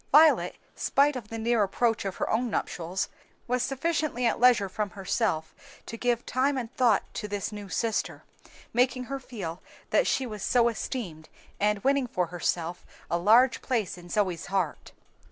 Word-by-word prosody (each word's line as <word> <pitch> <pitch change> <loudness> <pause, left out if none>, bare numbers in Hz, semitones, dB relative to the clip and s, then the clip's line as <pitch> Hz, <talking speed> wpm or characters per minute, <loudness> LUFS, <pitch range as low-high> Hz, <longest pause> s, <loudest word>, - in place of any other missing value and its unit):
Violet, 310 +2 +6 0.2
spite 285 +1 +2
of 240 -5 -6
the 225 - -6
near 230 0 +2
approach 225 +2 +1
of 195 - -3
her - - -2
own 240 +2 +1
nuptials, 180 -3 -2 0.4
was 250 0 +1
sufficiently 285 -2 -1
at 230 - +1
leisure 240 -5 +5
from 205 +2 -3
herself 190 -4 -1 0.3
to - - -6
give 240 0 0
time 270 +2 +1
and 245 -1 -4
thought 235 -6 +4
to 210 - -4
this 205 0 -3
new 205 -2 -8
sister, 225 +3 -1 0.5
making 250 +1 +2
her 275 +2 -4
feel 190 -10 -6 0.3
that - - +3
she 265 - +1
was 215 -4 -6
so 235 +2 +3
esteemed, 195 - -5 0.3
and 210 0 +1
winning 275 -1 +2
for 180 -6 0
herself 175 0 -2 0.3
a 170 - +2
large 235 +8 +5
place 230 -8 -1
in 175 -1 -13
Zoe's 185 -4 0
heart. 190 -5 -2
225 Hz, 170 wpm, -28 LUFS, 195-250 Hz, 0.5 s, Violet